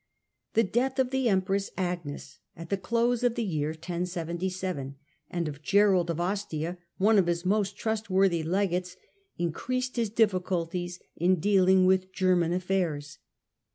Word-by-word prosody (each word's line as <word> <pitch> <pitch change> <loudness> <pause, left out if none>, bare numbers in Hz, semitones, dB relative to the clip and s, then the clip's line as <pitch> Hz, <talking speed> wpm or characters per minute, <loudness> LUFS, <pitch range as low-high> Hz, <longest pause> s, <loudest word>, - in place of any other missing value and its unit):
The 225 - +5
death 255 +6 0
of 260 -1 +1
the 265 -3 +1
empress 195 0 +1
Agnes 175 -6 -4 0.2
at 165 0 -10
the - - +3
close 235 +4 +1
of 245 -1 +2
the 235 - -1
year 155 -7 -1
1077 175 -2 -4 0.3
and 170 -2 -2
of 145 -1 -7
Gerald 195 0 +3
of 170 -1 -2
Ostia, 175 -2 -2 0.2
one 210 +2 +4
of 180 - +2
his 170 +1 -1
most 200 +1 +1
trustworthy 195 -6 +1
legates, 180 +1 -1 0.4
increased 255 +10 -2
his 230 -3 +1
difficul 185 -6 +1
ties 175 -1 -4 0.2
in 180 +3 +3
dealing 190 0 +4
with 185 0 +2
German 180 -3 +2
afiairs. 175 -6 -1
185 Hz, 145 wpm, -28 LUFS, 170-205 Hz, 0.4 s, The